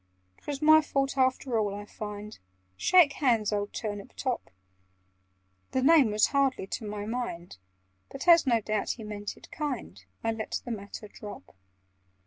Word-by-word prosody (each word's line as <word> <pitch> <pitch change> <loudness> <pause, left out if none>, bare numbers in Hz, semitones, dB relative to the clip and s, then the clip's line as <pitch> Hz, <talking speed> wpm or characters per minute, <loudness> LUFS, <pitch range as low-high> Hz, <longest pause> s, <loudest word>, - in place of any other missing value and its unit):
"'Twas 290 0 -5
my 310 +1 +8
fault 275 -2 -1
after 260 -2 +1
all, 205 -2 -1
I 205 0 -7
find— 210 0 -8 0.4
Shake 340 - +5
hands, 230 -7 +2
old 205 0 -1
Turnip 205 +1 -5
top!" 255 -3 -3 1.2
The 260 - +1
name 295 -4 +6
was 210 0 +4
hardly 275 -7 +2
to 200 - -5
my 205 0 -4
mind, 210 - -5 0.5
But, 275 +5 -7
as 335 -4 +7
no 235 -3 +3
doubt 215 -1 -1
he 225 - -10
meant 205 -1 -6
it - - -16
kind, 265 - -4 0.2
I 225 - +1
let 220 -1 -3
the 245 - -4
matter 210 0 -7
drop. 205 0 -10
225 Hz, 155 wpm, -28 LUFS, 205-275 Hz, 1.2 s, my